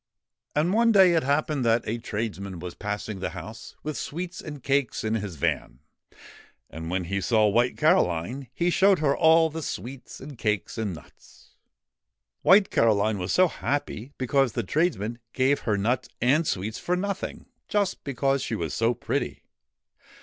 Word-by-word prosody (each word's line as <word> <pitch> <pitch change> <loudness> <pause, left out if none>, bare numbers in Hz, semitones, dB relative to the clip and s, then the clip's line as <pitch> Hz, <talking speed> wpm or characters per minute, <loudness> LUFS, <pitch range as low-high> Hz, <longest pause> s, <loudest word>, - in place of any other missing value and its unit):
And 160 +5 +2
one 230 +1 +4
day 190 -4 +6
it 165 - +3
happened 145 0 0
that 115 0 +2
a 115 +2 -2
tradesman 105 -4 -4
was 85 +1 -7
passing 105 0 -4
the 95 - -2
house 115 +2 -9
with 155 0 -3
sweets 175 +3 -5
and 145 -4 -8
cakes 140 -3 0
in 110 0 -1
his 105 -5 -3
van, 65 -3 -2 0.9
and 80 +1 -6
when 90 +1 -1
he 100 +3 -2
saw 110 0 +3
White 120 +4 +2
Caroline, 125 - +1
he 170 +6 0
showed 195 +1 +5
her 140 -3 +2
all 160 0 +5
the 160 +1 -5
sweets 135 -2 -7
and 135 -2 -10
cakes 105 -5 -1
and 105 -5 -2
nuts. 75 - -18 0.9
White 195 +1 +5
Caroline 110 -2 +2
was 90 +1 -2
so 185 0 +5
happy, 140 -6 -3
because 130 -1 +1
the - - -1
tradesman 120 - -1
gave 135 +2 +2
her 105 -3 0
nuts 120 +4 0
and 145 +7 +3
sweets 105 +4 -2
for 180 - 0
nothing, 195 +1 -4 0.2
just 205 -3 0
because 135 0 0
she 115 - -2
was 85 -7 -3
so 115 +1 +1
pretty. - - -3
125 Hz, 165 wpm, -26 LUFS, 105-155 Hz, 0.9 s, day